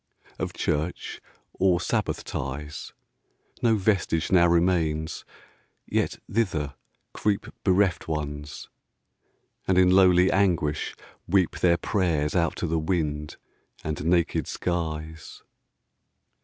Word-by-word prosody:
Of - - -3
church, 80 +4 -2 0.3
or 90 -2 +2
sabbath - - -1
ties, 75 +2 -5 0.7
5 - - -23
No 115 -2 +4
vestige 95 -5 +1
now 85 -2 +6
remains; 85 -2 +1 0.6
yet - - -1
thither 85 -11 -1 0.4
creep 100 -1 0 0.2
Bereft 95 -2 +2
Ones, 75 -1 -4 1.0
and 95 - +3
in 90 0 +6
lowly 90 -1 +5
anguish 85 -7 +1 0.3
weep 95 -1 +2
Their 85 -1 +4
prayers 85 -6 0
out 85 -2 +1
to - - -3
the 80 -1 0
wind 75 -3 -2 0.5
and 75 -1 -3
naked 85 +1 +1
skies. 80 -3 -4
85 Hz, 105 wpm, -26 LUFS, 75-95 Hz, 1.0 s, now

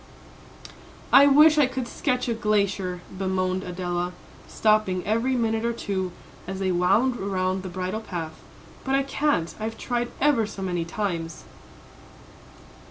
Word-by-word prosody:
"I 280 - +9
wish 300 +2 +6
I 285 - +5
could 260 -1 -4
sketch 250 +1 -1
a 235 - +1
glacier," 200 -5 0
bemoaned 185 -1 -1
Adela, 180 -1 -3 0.3
stopping 215 -4 +1
every 230 +5 +1
minute 225 -2 0
or 235 0 0
two, 190 -5 -3 0.4
as 190 0 -4
they 190 -1 0
wound 200 +9 +2
around 190 -1 -1
the 185 - -6
bridle 185 +4 -3
path, 170 -7 -5 0.5
"but 265 0 0
I 275 - +2
can't; 275 - 0
I've 220 +1 -4
tried 240 -1 -2
ever 270 -7 +3
so 195 -2 -7
many 175 -3 -1
times." 170 -3 -3
200 Hz, 140 wpm, -25 LUFS, 185-240 Hz, 0.5 s, I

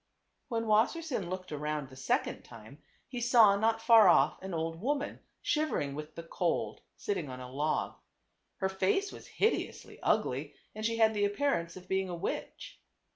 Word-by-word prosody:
When 230 -4 -2
Wassersein 225 - +1
looked 185 -1 -5
around 150 -1 -3
the 130 - -13
second 130 - -1
time 115 +5 -14 0.3
he 245 -2 -5
saw 230 -4 +6
not 225 +2 +1
far 225 -3 +8
off - - +4
an 190 0 -6
old 165 0 -3
woman, 285 +4 -2 0.2
shivering 300 - 0
with 150 +1 -7
the 165 - -7
cold, 170 +1 -2 0.2
sitting 180 -8 -3
on 130 0 -7
a 125 0 -8
log. 150 +3 -1 0.6
Her 190 - 0
face 190 - 0
was - - -11
hideously 440 - -1
ugly - - 0 0.2
and 215 - -7
she 230 +1 0
had 220 -1 +4
the 205 -1 +1
appearance 200 -6 -1
of 180 0 -12
being 190 0 0
a 175 - -3
witch. 170 - -5
190 Hz, 170 wpm, -31 LUFS, 160-230 Hz, 0.6 s, far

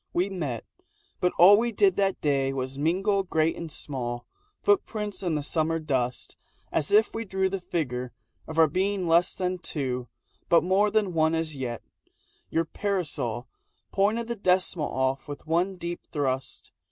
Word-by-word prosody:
We 185 +3 +1
met. 145 - -3 0.5
But 180 - +2
all 195 +4 +9
We 235 +2 +1
did 200 -3 +3
that 195 -1 +1
day 135 -2 +1
was 130 +1 -3
mingle 195 +6 +2
great 160 -3 +1
and 165 -2 -6
small 120 -5 -3 0.4
Footprints 215 - 0
in 170 -5 0
summer 160 +2 +1
dust 130 -6 -2 0.3
as 150 - 0
if 215 +2 +4
we 225 - -3
drew 190 -2 -1
The 195 -1 -3
figure 125 -8 -3 0.4
of 160 - -7
our 160 -1 +7
being 190 +3 0
less 170 +2 +4
than 185 0 -2
two 130 -7 -3 0.4
But 170 - +5
more 195 +4 +3
than 205 -3 +1
one 160 0 +2
as 160 -2 -2
yet. 125 -4 -4 0.7
Your 165 +1 +1
parasol 145 - -2 0.4
Pointed 215 +4 +1
the 235 - -2
decimal 180 -5 +1
off 130 +1 -1
with 145 0 -8
one 175 +4 +1
deep 175 -1 -5
thrust. 135 -3 -2
165 Hz, 160 wpm, -27 LUFS, 140-195 Hz, 0.7 s, all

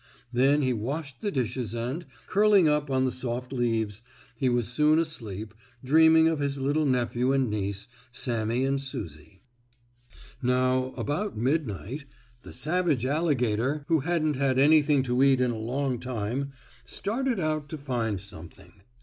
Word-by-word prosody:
Then 140 +4 +3
he 130 -1 +2
washed 135 +4 -4
the 205 - -1
dishes 125 - -2
and, 125 +9 -3 0.2
curling 205 -4 +4
up 150 -1 +1
on 130 -1 +2
the 130 - 0
soft 125 0 -4
leaves, 115 -4 -1 0.3
he 130 +2 +1
was 120 -2 +1
soon 150 +6 +3
asleep, 110 - -4 0.3
dreaming 160 +3 +6
of 160 -2 0
his 140 -1 -1
little 145 +3 +1
nephew 125 0 +1
and 130 -5 +1
niece, 100 -1 -3 0.2
Sammie 120 0 -1
and 135 0 0
Susie. 80 - -8 1.0
Now, 130 +1 +1
about 185 - -2
midnight, 130 - -2 0.4
the - - -11
savage 155 -2 0
alligator, 140 -2 0
who 165 -1 +4
hadn't 155 -1 0
had 135 -1 +1
anything 145 0 +5
to 125 0 0
eat 135 -1 +5
in 125 -1 +2
a - - -3
long 125 +2 -2
time, 125 +2 -3 0.3
started 245 +1 -2
out 155 -3 -1
to 155 - -5
find 120 -8 -2
something. 95 +1 -12
130 Hz, 150 wpm, -27 LUFS, 120-150 Hz, 1.0 s, dreaming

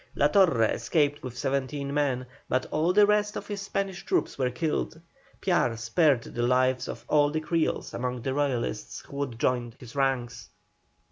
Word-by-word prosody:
La - - +4
Torre 180 - +4
escaped 145 +5 +1
with 125 -1 -7
seventeen 140 +1 -2
men, 135 -4 0 0.2
but 130 +1 +1
all 160 +3 +2
the 205 +2 +6
rest 210 0 +2
of - - -5
his 205 -1 -5
Spanish 195 -1 -3
troops 370 - 0
were 130 -2 0
killed. 160 +3 -2 0.4
Piar 175 -11 +2
spared 120 +3 +2
the 120 - -5
lives 125 +1 +2
of 115 0 -7
all 145 -1 +4
the 155 +2 -1
Creoles 160 +1 -1
among 125 -1 -3
the 135 - -1
Royalists 130 -6 -2
who 140 - -11
would 135 -5 -3
join 120 -1 0
his 120 -1 -12
ranks. 130 -4 -1
140 Hz, 175 wpm, -27 LUFS, 125-160 Hz, 0.4 s, the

